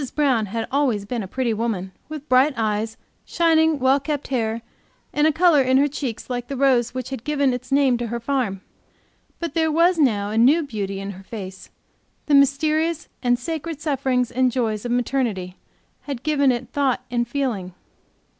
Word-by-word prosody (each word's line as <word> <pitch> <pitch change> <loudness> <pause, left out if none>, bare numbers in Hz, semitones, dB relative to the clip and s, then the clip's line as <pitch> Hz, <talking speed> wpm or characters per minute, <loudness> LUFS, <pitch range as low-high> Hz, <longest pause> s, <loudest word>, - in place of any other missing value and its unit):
Brown 260 -8 +2
had 225 +3 -3
always 255 -8 +1
been 235 +2 -3
a 195 - -6
pretty 245 +2 -1
woman, 210 -4 -2 0.2
with 305 -1 -7
bright 265 +2 +4
eyes, 220 0 -1 0.3
shining, 320 -2 +2
well 265 +1 +3
kept 290 0 -4
hair, 230 -3 -1 0.5
and 295 +1 +3
a - - +4
color 325 -2 +4
in 260 0 +3
her 285 +2 +4
cheeks 270 -5 -5
like 245 -1 -4
the 275 - -5
rose 250 -3 +2
which 255 0 -4
had 265 -4 -5
given 285 -3 +1
its 250 +1 -6
name 270 -3 +3
to 240 - -2
her 235 +1 -3
farm. 235 -6 -1 0.8
But 335 -4 -4
there 320 -1 +1
was 335 +2 +3
now 210 -8 +2
a 220 - +1
new 290 +8 +5
beauty 200 -7 -4
in 195 0 -5
her 190 0 -11
face; 190 -3 -8 0.6
the 300 - 0
mysterious 305 +4 +2
and 245 -1 +2
sacred 320 +3 -5
sufferings 265 -5 0
and 255 0 +2
joys 225 -3 -1
of 240 - -2
maternity 235 -7 -1 0.5
had 275 -4 -5
given 285 -3 +3
it 240 -1 -3
thought 265 -3 0
and 240 -1 0
feeling. 230 -9 -3
255 Hz, 185 wpm, -22 LUFS, 225-285 Hz, 0.8 s, new